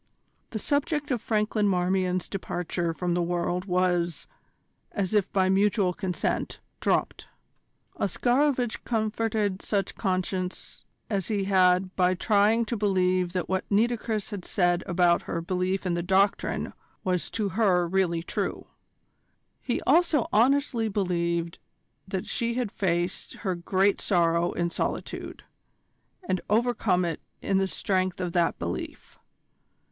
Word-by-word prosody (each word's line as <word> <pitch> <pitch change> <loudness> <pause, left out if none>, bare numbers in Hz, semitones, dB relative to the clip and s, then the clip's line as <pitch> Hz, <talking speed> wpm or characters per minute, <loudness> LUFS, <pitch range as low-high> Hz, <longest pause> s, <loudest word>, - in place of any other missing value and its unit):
The 220 - -4
subject 290 +4 -1
of 245 -4 0
Franklin 215 -1 +1
Marmion's 185 -1 +1
departure 175 -2 -2
from 175 +1 -2
the 175 - +1
world 175 +1 -1
was, 180 -2 0 0.7
as 200 -1 -2
if 205 -3 +2
by 190 -1 +2
mutual 195 0 +2
consent, 185 -1 -2 0.2
dropped. - - 0 0.7
Oscarovitch 245 - +1
comforted 215 -3 -1
such 200 -3 -1
conscience 185 -1 -3 0.2
as 195 -4 -1
he 205 -3 0
had 185 -1 +3
by 185 0 +3
trying 215 +4 +3
to 235 - -2
believe 185 -3 +1
that 180 -2 -2
what 190 0 -2
Nitocris 220 0 0
had 200 -3 -5
said 175 -2 +1
about 175 -1 +3
her 170 - -1
belief 185 +3 -1
in 180 - 0
the 170 - 0
Doctrine 190 +3 +1 0.3
was 180 -2 0
to 210 -3 -1
her 185 -4 +2
really 170 -2 +1
true. - - -3 1.0
He - - -1
also 335 -6 +3
honestly 245 0 +3
believed 170 -4 -1 0.5
that 190 -1 -3
she 235 -1 -1
had 245 -5 -1
faced 175 -2 -1
her 190 - +1
great 190 +3 +1
sorrow 170 -2 +2
in 170 0 -1
solitude, - - -4 0.8
and 185 - 0
overcome 215 -5 +2
it 165 -2 -3 0.2
in 195 -1 +1
the 195 - +1
strength 185 -1 -1
of 180 -2 -3
that 170 -2 +2
belief. 85 +1 -6
190 Hz, 130 wpm, -27 LUFS, 180-210 Hz, 1.0 s, had